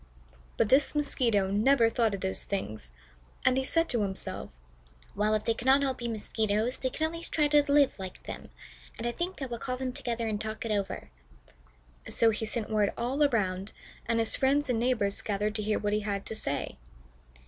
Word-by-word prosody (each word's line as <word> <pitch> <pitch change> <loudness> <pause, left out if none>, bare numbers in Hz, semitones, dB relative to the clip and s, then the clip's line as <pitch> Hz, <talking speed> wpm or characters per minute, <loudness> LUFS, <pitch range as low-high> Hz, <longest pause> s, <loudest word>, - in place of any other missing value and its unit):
But 205 - +2
this 275 +3 +4
Mosquito 230 -9 +1
never 230 +4 +4
thought 225 -2 +1
of 195 - -8
those 190 0 -2
things, 110 - -4 0.5
and 255 - +5
he 265 - +1
said 330 +5 +2
to 235 -4 +1
himself: 195 -2 -4 0.7
"Well, 210 +1 +2
if 215 - -2
they 230 - +3
cannot 265 +5 +3
all 270 -1 +1
be 240 -2 -5
Mosquitoes, 220 +1 -1
they 260 - -1
can 315 - -1
at 320 - -1
least 335 0 -5
try 300 -2 +3
to 290 -1 +4
live 285 -1 +5
like 185 -1 -7
them, - - -8 0.5
and 230 - -5
I 240 - +1
think 345 +2 -4
I - - -1
will 240 -2 -5
call 255 +1 -3
them 255 -1 -3
together 235 -2 -2
and 210 -1 -2
talk 220 +1 -4
it 225 - -2
over." 200 - -2 1.0
So 225 -1 +4
he 220 +1 -3
sent 220 0 -3
word 210 -2 +2
all 255 +5 -1
around, 200 -7 0 0.3
and 230 0 +1
his 225 -1 +1
friends 275 0 +2
and 230 - +1
neighbors 230 -5 +1
gathered 210 0 -1
to 215 - -2
hear 210 0 +1
what 205 0 -1
he 210 - +2
had 200 -1 -3
to 220 - -5
say. 140 -9 -3
230 Hz, 205 wpm, -29 LUFS, 210-265 Hz, 1.0 s, and